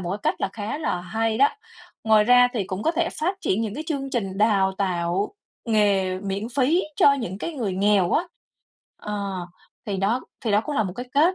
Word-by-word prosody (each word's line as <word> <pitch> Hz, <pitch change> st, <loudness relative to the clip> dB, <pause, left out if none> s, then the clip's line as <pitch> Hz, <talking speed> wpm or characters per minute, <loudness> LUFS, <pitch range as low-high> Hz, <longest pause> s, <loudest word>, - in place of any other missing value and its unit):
một 175 Hz, -1 st, -4 dB
cái 200 Hz, -, -2 dB
cách -, -, 0 dB
là -, -, 0 dB
khá 220 Hz, +7 st, -4 dB
là 240 Hz, -, -1 dB
hay 220 Hz, +5 st, -1 dB
đó. 280 Hz, -, +6 dB, 0.6 s
Ngoài 215 Hz, -1 st, +5 dB
ra 245 Hz, +1 st, +6 dB
thì 210 Hz, -6 st, -1 dB
cũng 185 Hz, +3 st, -5 dB
có 325 Hz, -, +2 dB
thể 335 Hz, -, 0 dB
phát 375 Hz, +5 st, -1 dB
triển 205 Hz, -, 0 dB
những 215 Hz, -2 st, -3 dB
cái 310 Hz, +3 st, -5 dB
chương 275 Hz, -4 st, -3 dB
trình 195 Hz, -6 st, -2 dB
đào 200 Hz, -3 st, +3 dB
tạo 185 Hz, -, -1 dB, 0.3 s
nghề 200 Hz, -4 st, +2 dB
miễn 200 Hz, +3 st, -3 dB
phí 285 Hz, +8 st, +2 dB
cho 280 Hz, -, +6 dB
những 220 Hz, -8 st, -3 dB
cái 335 Hz, -, -4 dB
người 225 Hz, -8 st, -2 dB
nghèo 195 Hz, -2 st, +3 dB
á, 340 Hz, -, +2 dB, 0.8 s
ờ, 200 Hz, -4 st, -4 dB, 0.4 s
thì 200 Hz, -2 st, -2 dB
đó 210 Hz, +7 st, +1 dB, 0.2 s
thì 225 Hz, -, -2 dB
đó 205 Hz, -, +4 dB
cũng 295 Hz, +4 st, -4 dB
là 220 Hz, -, +3 dB
một 185 Hz, -3 st, -4 dB
cái 250 Hz, +1 st, -5 dB
cách 325 Hz, +6 st, +4 dB
210 Hz, 215 wpm, -24 LUFS, 195-255 Hz, 0.8 s, đó